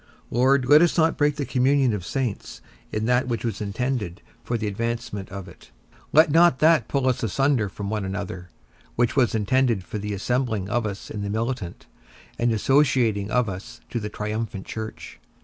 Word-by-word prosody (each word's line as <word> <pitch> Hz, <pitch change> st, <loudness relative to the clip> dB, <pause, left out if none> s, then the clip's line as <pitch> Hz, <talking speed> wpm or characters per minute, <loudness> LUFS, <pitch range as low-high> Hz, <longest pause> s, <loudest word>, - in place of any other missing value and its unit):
Lord, 130 Hz, +2 st, +3 dB
let 145 Hz, +4 st, +7 dB
not 175 Hz, 0 st, +3 dB
us -, -, -11 dB
break 145 Hz, -1 st, +2 dB
the 145 Hz, -2 st, -3 dB
communion 130 Hz, -1 st, +2 dB
of 100 Hz, -4 st, -3 dB
saints 120 Hz, +3 st, -3 dB, 0.3 s
in 110 Hz, +1 st, -2 dB
that 125 Hz, +2 st, +2 dB
which 120 Hz, -2 st, -2 dB
was 115 Hz, -, -3 dB
intended 105 Hz, -3 st, -3 dB, 0.2 s
for 120 Hz, -, -1 dB
the 110 Hz, -, -3 dB
advancement 115 Hz, -1 st, -3 dB
of 100 Hz, -1 st, -7 dB
it; 90 Hz, -, -15 dB, 0.4 s
let 155 Hz, 0 st, +6 dB
not 165 Hz, -3 st, +5 dB
that 160 Hz, +3 st, +4 dB
pull 135 Hz, -2 st, 0 dB
us 130 Hz, -, +1 dB
asunder 120 Hz, 0 st, +1 dB
from 100 Hz, +1 st, -5 dB
one 105 Hz, -2 st, -1 dB
another, 95 Hz, -2 st, -5 dB, 0.5 s
which 120 Hz, 0 st, +1 dB
was 125 Hz, -5 st, +3 dB
intended 115 Hz, -1 st, +1 dB
for 105 Hz, -, -6 dB
the 105 Hz, 0 st, -3 dB
assembling 110 Hz, -2 st, -1 dB
of 115 Hz, 0 st, 0 dB
us 100 Hz, -1 st, -7 dB
in 105 Hz, -, -4 dB
the 100 Hz, -, -3 dB
militant, 110 Hz, -4 st, -3 dB, 0.5 s
and 120 Hz, 0 st, +2 dB
associating 115 Hz, -4 st, +2 dB
of 125 Hz, +1 st, +2 dB
us 95 Hz, 0 st, -7 dB
to 120 Hz, -, -1 dB
the 105 Hz, -1 st, -4 dB
triumphant 105 Hz, -1 st, -4 dB
church. 110 Hz, 0 st, -7 dB
115 Hz, 185 wpm, -24 LUFS, 105-130 Hz, 0.5 s, let